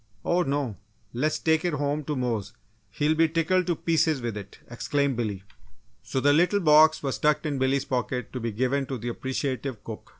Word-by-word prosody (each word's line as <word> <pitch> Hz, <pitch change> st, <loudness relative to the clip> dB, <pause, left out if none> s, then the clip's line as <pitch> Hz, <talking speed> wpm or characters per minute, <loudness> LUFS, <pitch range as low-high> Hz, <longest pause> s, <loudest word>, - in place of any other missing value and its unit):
"Oh, 175 Hz, +1 st, +2 dB
no! 140 Hz, -, -1 dB, 0.4 s
Let's 155 Hz, +6 st, 0 dB
take 160 Hz, 0 st, +1 dB
it 175 Hz, -2 st, 0 dB
home 145 Hz, +1 st, -1 dB
to 150 Hz, -, -2 dB
Mose; 120 Hz, -6 st, -2 dB, 0.4 s
he 145 Hz, -, -1 dB
will 155 Hz, -, +4 dB
be 160 Hz, 0 st, +3 dB
tickled 175 Hz, +3 st, +1 dB
to 175 Hz, -, +1 dB
pieces 160 Hz, -2 st, +1 dB
with 120 Hz, -3 st, -4 dB
it," 100 Hz, -1 st, -9 dB
exclaimed 140 Hz, +3 st, -1 dB
Billy. 105 Hz, -5 st, -3 dB, 0.6 s
So 135 Hz, -, -3 dB
the 145 Hz, +2 st, +4 dB
little 180 Hz, +6 st, +3 dB
box 155 Hz, -2 st, +5 dB
was 135 Hz, -2 st, -2 dB
tucked 150 Hz, +1 st, +2 dB
in 145 Hz, -3 st, -1 dB
Billy's 130 Hz, +1 st, +1 dB
pocket 125 Hz, -2 st, -3 dB
to 130 Hz, -, -3 dB
be 115 Hz, -1 st, -3 dB
given 130 Hz, +5 st, 0 dB
to 135 Hz, -, -3 dB
the 120 Hz, +1 st, -4 dB
appreciative 130 Hz, -2 st, -3 dB
cook. 110 Hz, -2 st, -8 dB
140 Hz, 200 wpm, -26 LUFS, 125-155 Hz, 0.6 s, box